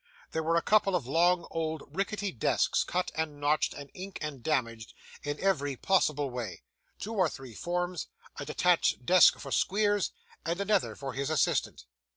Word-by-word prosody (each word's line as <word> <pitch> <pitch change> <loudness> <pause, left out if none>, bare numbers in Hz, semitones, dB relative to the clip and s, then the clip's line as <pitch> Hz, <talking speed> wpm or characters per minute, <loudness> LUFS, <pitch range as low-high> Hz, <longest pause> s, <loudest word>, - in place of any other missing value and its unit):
There 160 - -1
were 165 +1 +1
a 170 - +2
couple 205 -3 +3
of 165 -8 -1
long 170 +5 +3
old 160 -2 -2
rickety 200 0 -1
desks, 115 - +1
cut 180 0 -2
and 155 -2 -3
notched, 150 +1 +1
and 140 -1 -9
inked, 190 +1 -7
and 150 -4 -5
damaged, 115 -6 -2 0.3
in 145 0 -4
every 145 -8 +1
possible 150 -7 +1
way; 120 -7 -5 0.3
two 220 - -5
or 185 -6 +2
three 130 -5 -10
forms; 175 +2 -2 0.3
a - - -4
detached 165 -4 +2
desk 180 +3 +7
for - - -8
Squeers; 205 0 +2 0.3
and 170 +4 -2
another 200 -1 +1
for 135 -2 -6
his 140 +3 -2
assistant. 150 - 0
160 Hz, 170 wpm, -30 LUFS, 140-185 Hz, 0.3 s, desk